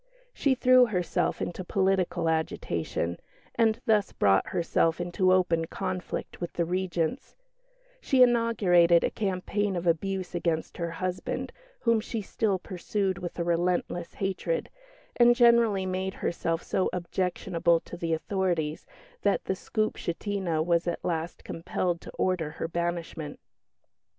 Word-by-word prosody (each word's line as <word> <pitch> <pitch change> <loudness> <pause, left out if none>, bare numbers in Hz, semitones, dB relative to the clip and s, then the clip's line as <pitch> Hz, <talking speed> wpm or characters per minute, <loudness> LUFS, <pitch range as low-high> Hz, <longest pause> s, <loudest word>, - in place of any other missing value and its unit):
She 275 -2 +2
threw 255 0 +6
herself 180 -5 -1
into 180 +2 -4
political 185 -2 +1
agitation, 85 - -1 0.3
and 225 -2 +2
thus 210 -4 +2
brought 95 -1 +3
herself 165 -1 +1
into 175 +2 +1
open 175 -3 +3
conflict 180 +2 -5
with 175 - -4
the 170 - 0
Regents; 180 - -2 0.7
she 260 -2 +5
inaugurated 200 -8 +4
a - - +1
campaign 200 0 -1
of 175 0 -3
abuse 185 +2 0
against 170 -2 -2
her 170 -1 -2
husband, 180 +2 -3 0.3
whom 230 -2 +3
she 225 -1 -4
still 200 0 0
pursued 185 +1 -2
with 175 - -6
a 170 - 0
relentless 175 0 -1
hatred; 195 - -2 0.5
and 240 0 +6
generally 235 -5 +4
made 185 +1 -2
herself 165 0 -2
so 190 - 0
objectionable 175 -1 0
to - - -9
the 165 -2 -1
authorities 170 -4 -2 0.3
that - - +1
the - - 0
Skupshtina 190 -4 -2
was 170 0 +1
at 175 - -3
last 165 -1 -3
compelled 170 +1 -2
to - - -10
order 180 -4 0
her - - -2
banishment. 170 -3 -3
180 Hz, 130 wpm, -28 LUFS, 170-195 Hz, 0.7 s, threw